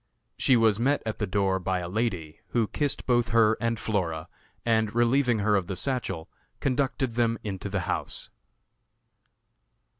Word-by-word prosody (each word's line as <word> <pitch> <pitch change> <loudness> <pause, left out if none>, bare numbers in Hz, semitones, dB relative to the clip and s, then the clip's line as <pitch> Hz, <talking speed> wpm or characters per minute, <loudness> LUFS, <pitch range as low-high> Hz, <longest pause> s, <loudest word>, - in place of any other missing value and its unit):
She 130 - +4
was 110 -2 +3
met 140 +5 +1
at 110 - -3
the 105 - -1
door 95 -1 +1
by 95 0 -1
a 90 -1 -4
lady, 90 -6 -2
who 115 -2 +1
kissed 145 +4 -1
both 120 -2 +2
her 115 -1 +4
and 115 -1 0
Flora, 85 -7 -2 0.4
and, 110 -2 +1
relieving 120 +1 +3
her 105 0 +2
of 95 -3 0
the 95 - -3
satchel, 95 -8 -2 0.3
conducted 130 -2 0
them 115 -1 +1
into 100 -1 -4
the 95 -1 -1
house. - - -4
110 Hz, 155 wpm, -27 LUFS, 95-120 Hz, 0.4 s, She